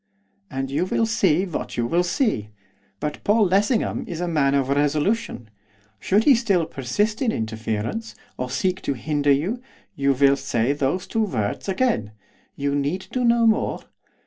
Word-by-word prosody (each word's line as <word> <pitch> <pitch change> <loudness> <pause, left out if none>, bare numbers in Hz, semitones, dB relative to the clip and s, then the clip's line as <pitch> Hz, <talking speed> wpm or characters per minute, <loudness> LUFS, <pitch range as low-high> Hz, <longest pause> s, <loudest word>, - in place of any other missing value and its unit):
And 135 0 -4
you 145 +6 +1
will 225 - +1
see 195 -6 +2
what 175 - -5
you 120 - +1
will 170 +9 +2
see. 175 - 0 0.5
But 150 -1 -4
Paul 210 +1 +4
Lessingham 205 +5 +1
is 170 -3 -5
a 175 - -1
man 145 -4 +2
of 135 -1 +1
resolution. 145 - 0 0.5
Should 205 - +2
he 285 - +7
still 205 -8 +2
persist 170 - -1
in 245 -4 +2
interference, 110 - -3 0.2
or 125 0 -4
seek 185 +9 -1
to - - -1
hinder 145 +2 0
you, 180 - 0 0.3
you 140 0 +2
will 140 +1 +4
say 135 -1 0
those 145 +6 -1
two 225 -1 0
words 110 - -3
again. 190 - 0 0.4
You 140 0 -1
need 145 +7 -2
do 255 - -1
no 235 -1 +4
more. 220 -1 +1
155 Hz, 165 wpm, -23 LUFS, 135-210 Hz, 0.5 s, he